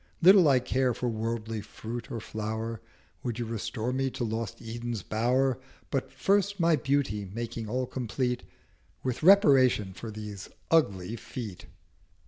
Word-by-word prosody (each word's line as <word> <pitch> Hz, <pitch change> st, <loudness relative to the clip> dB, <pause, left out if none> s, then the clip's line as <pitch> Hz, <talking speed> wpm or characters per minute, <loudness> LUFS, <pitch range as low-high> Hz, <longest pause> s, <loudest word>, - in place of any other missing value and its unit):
Little 185 Hz, -1 st, +8 dB
I 135 Hz, -2 st, +6 dB
care 125 Hz, 0 st, +1 dB
for 125 Hz, -, -1 dB
Worldly 115 Hz, -1 st, -3 dB
Fruit 115 Hz, +4 st, -7 dB
or 120 Hz, -4 st, -4 dB
Flower, 110 Hz, +1 st, -4 dB, 0.4 s
Would 120 Hz, -3 st, -3 dB
you 120 Hz, -, -2 dB
restore 115 Hz, +2 st, -3 dB
me 135 Hz, +1 st, 0 dB
to 130 Hz, -1 st, -4 dB
lost 110 Hz, -3 st, -3 dB
Eden's 115 Hz, -2 st, -5 dB
Bower, 125 Hz, +4 st, +1 dB, 0.3 s
But -, -, -1 dB
first 200 Hz, 0 st, +1 dB
my 165 Hz, -1 st, +5 dB
Beauty 135 Hz, -9 st, 0 dB
making 115 Hz, 0 st, -4 dB
all 130 Hz, +3 st, 0 dB
complete 125 Hz, 0 st, -2 dB, 0.6 s
With 130 Hz, -2 st, -2 dB
reparation 135 Hz, -, +6 dB
of 110 Hz, -2 st, -6 dB
these 105 Hz, -3 st, -7 dB, 0.2 s
ugly 105 Hz, -, +2 dB
Feet.' 115 Hz, -4 st, -7 dB
120 Hz, 140 wpm, -29 LUFS, 110-130 Hz, 0.6 s, Little